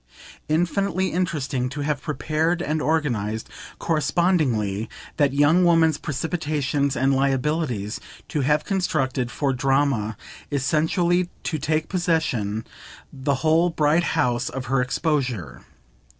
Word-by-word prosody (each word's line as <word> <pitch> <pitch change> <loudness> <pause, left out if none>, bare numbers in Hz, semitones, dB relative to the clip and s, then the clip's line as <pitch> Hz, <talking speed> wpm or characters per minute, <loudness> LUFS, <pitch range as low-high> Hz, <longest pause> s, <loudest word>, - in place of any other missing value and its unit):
Infinitely 185 +4 +1
interesting 145 -7 -1
to 140 +3 -5
have 145 -1 -1
prepared 155 +4 0
and 155 -1 -1
organised, 115 -10 -1 0.3
correspondingly, 140 - +1 0.3
that 145 -3 +3
young 145 +6 +4
woman's 165 -3 +4
precipitations 145 -2 -1
and 135 +2 +3
liabilities, 135 -5 0 0.3
to 150 - -1
have 150 +3 +2
constructed, 135 -10 0
for 135 +3 -1
Drama 135 -4 +1 0.3
essentially 170 +5 +1
to 155 - -2
take 155 +2 0
possession, 140 - 0 0.5
the 140 +1 0
whole 165 +3 +4
bright 160 +1 +2
house 120 -4 +1
of 135 0 -5
her 130 +1 +1
exposure. 125 - -1
145 Hz, 110 wpm, -23 LUFS, 130-160 Hz, 0.5 s, young